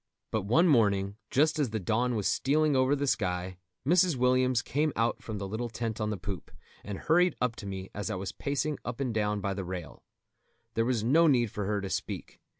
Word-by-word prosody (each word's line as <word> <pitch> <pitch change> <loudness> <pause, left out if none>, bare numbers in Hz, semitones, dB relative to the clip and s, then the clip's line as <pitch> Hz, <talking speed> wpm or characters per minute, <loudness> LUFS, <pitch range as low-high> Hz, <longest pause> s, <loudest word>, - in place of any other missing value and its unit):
But 110 - 0
one 165 - +5
morning, 100 - +3
just 155 +3 +2
as 140 -5 +1
the 110 0 -2
dawn 115 +6 0
was 105 -3 0
stealing 150 +2 +2
over 130 +2 +3
the 145 0 -1
sky, 90 -7 -1 0.3
Mrs. 175 0 +4
Williams 125 -1 +2
came 150 +2 0
out 115 +1 0
from 110 -2 -5
the 100 -1 -4
little 115 +4 -3
tent 115 -1 -4
on 105 - 0
the 105 - -2
poop, 95 -2 -6 0.3
and 100 -2 -5
hurried 175 - +3
up 125 -2 0
to 100 - -7
me 95 -1 -6
as 100 -2 -4
I - - -2
was 95 0 -4
pacing 145 +1 -2
up 120 +1 -5
and 130 -4 -1
down 105 -1 0
by 100 0 -1
the 95 0 -4
rail. 90 -2 -7 0.7
There 115 - +1
was 120 -3 0
no 160 +8 +5
need 120 -7 +3
for 105 - -3
her 105 0 0
to 95 - -4
speak. - - -4
115 Hz, 220 wpm, -29 LUFS, 100-135 Hz, 0.7 s, one